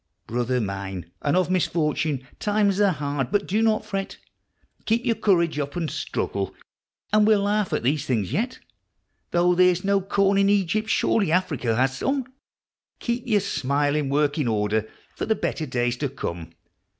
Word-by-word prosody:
Brother 125 +2 -1
mine, 95 -4 -5
and 145 +4 +1
of 185 -1 +1
misfortune! 155 -6 0
times 205 -1 +1
are 205 - +5
hard, 140 -4 -2
but 205 -1 +1
do 210 +4 +1
not 220 -1 +2
fret, 195 -2 -4 0.7
Keep 230 +2 +1
your 235 - +3
courage 170 -8 +2
up 145 +2 -3
and 165 -3 -2
struggle, 95 -1 -3 0.6
and 215 0 +5
we'll 215 -2 +4
laugh 205 -1 0
at - - -1
these 140 +3 +1
things 110 -8 -1
yet. 245 +4 -1 0.7
Though 175 +1 +3
there 180 +1 +5
is 180 0 -1
no 200 0 +2
corn 195 +1 +2
in 200 0 +4
Egypt, 205 +2 +1
surely 200 -6 +2
Africa 155 -10 +1
has 130 +2 +1
some 270 -1 0 0.7
Keep 240 +1 -3
your 210 -4 +3
smile 145 0 0
in 150 -3 0
working 145 0 +1
order 110 0 0 0.3
for - - -3
the 220 - +2
better 160 -5 -3
days 120 -1 0
to 145 +1 -2
come 85 -10 -6
165 Hz, 170 wpm, -24 LUFS, 130-200 Hz, 0.7 s, are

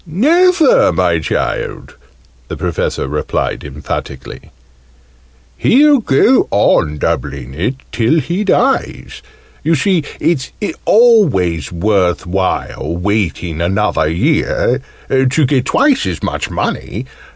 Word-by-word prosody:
"Never, 315 - +3
my 85 -1 +1
child!" - - -3 0.5
the - - -6
Professor - - -2
replied 75 +2 -3
emphatically. 70 -1 -7 1.1
"He'll 290 +2 +4
go 225 - +3
on 75 -6 +2
doubling 70 -3 -3
it, 95 - -2 0.2
till 115 +8 +1
he 175 +6 -2
dies. 255 +6 -1 0.4
You 165 +1 +2
see 180 +1 +1 0.2
it's 145 -5 -1 0.3
always 150 - +3
worth 90 0 0
while 85 -3 -2
waiting 90 -4 -2
another 95 -2 0
year, 80 +2 0 0.3
to 135 +3 +2
get 130 -1 +1
twice 280 -1 +2
as - - -4
much - - -3
money! - - -4
110 Hz, 105 wpm, -15 LUFS, -, 1.1 s, He'll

